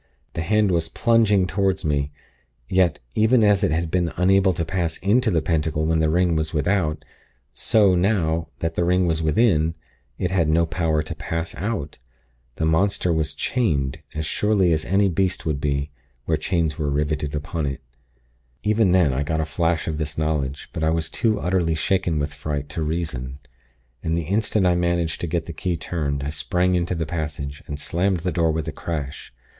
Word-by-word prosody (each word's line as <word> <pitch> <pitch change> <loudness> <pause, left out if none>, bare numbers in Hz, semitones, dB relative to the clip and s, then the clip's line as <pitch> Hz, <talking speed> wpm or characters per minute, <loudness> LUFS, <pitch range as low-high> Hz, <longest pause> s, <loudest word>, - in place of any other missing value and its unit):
The - - -3
hand 105 +3 +2
was 85 -2 0
plunging 105 -2 +3
toward 95 -1 0
me; 70 -1 0 0.6
yet, 90 -1 +2 0.2
even 110 +2 +4
as 105 -1 +4
it 95 - +3
had 80 +1 -1
been 85 -3 +1
unable 95 +1 +4
to 85 -1 -2
pass 85 -1 -1
into 110 +5 +2
the 80 -6 +1
Pentacle 80 -1 0
when 80 0 +2
the 80 -1 +2
ring 85 +1 +2
was 80 0 -1
without, 75 -3 0 0.5
so, 105 -4 +3
now 85 -4 +1
that 80 0 -1
the 85 - 0
ring 90 +1 +2
was 80 -2 0
within, 80 -1 +2 0.4
it 90 - -1
had 85 -5 +2
no 85 +2 +3
power 80 -2 0
to - - -5
pass 80 +1 -4
out. 95 -8 -4 0.6
The 80 - -1
monster 90 +2 +2
was 80 -2 -1
chained, 75 - 0
as 80 0 -2
surely 95 0 +2
as 80 0 -1
any 100 +3 +3
beast 95 +1 0
would 75 -3 -1
be, 70 0 -1 0.3
were - - +1
chains 80 -2 -1
riveted 75 0 -1
upon 75 +1 -3
it. 70 0 -5 0.8
"Even 105 -3 +3
then, 85 -8 +4
I 65 - -1
got 80 +2 -1
a 80 - 0
flash 80 +1 0
of 80 -2 -2
this 75 -1 -3
knowledge; 75 -3 -2
but 80 - -3
I 80 - +3
was 80 0 -1
too 110 -3 +1
utterly 90 -3 +1
shaken 90 0 0
with 75 0 -2
fright, 75 -1 -4
to 75 +2 -4
reason; 75 -5 -3 0.6
and 80 +1 -1
the 85 - -1
instant 100 +3 +1
I 90 - +4
managed 85 -2 0
to 85 - -2
get 85 0 -1
the 85 - -7
key 90 +2 -2
turned, 70 -5 -3
I 70 - -2
sprang 85 +6 0
into 90 0 0
the 80 -1 -2
passage, 75 -3 -4
and 75 0 -5
slammed 90 +3 0
the 90 +1 -1
door 85 -1 +2
with 80 0 -3
a - - -2
crash. 75 -3 -5
80 Hz, 190 wpm, -23 LUFS, 75-90 Hz, 0.8 s, even